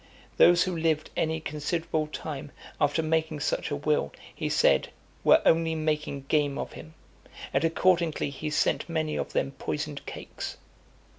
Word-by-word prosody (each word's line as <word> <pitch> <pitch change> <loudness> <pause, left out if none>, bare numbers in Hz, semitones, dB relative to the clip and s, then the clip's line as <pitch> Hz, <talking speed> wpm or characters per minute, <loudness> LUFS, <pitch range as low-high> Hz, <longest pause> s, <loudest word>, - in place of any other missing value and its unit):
Those 175 0 +7
who 185 -2 -2
lived 160 -2 0
any 160 0 0
considerable 155 +1 -2
time 150 -2 -6 0.3
after 145 +3 +2
making 160 -1 0
such - - -1
a 145 - -1
will, 145 - 0 0.2
he - - -3
said, - - +3 0.3
were - - +6
only 165 0 +3
making 150 -3 -1
game 145 0 +1
of - - -4
him; 160 +1 -11 0.6
and 135 +3 +2
accordingly 165 -3 +2
he 140 +3 -4
sent 150 - +1
many 155 -2 -1
of - - -3
them 135 - 0
poisoned 150 +1 -4
cakes. - - -6
155 Hz, 150 wpm, -28 LUFS, 145-160 Hz, 0.6 s, Those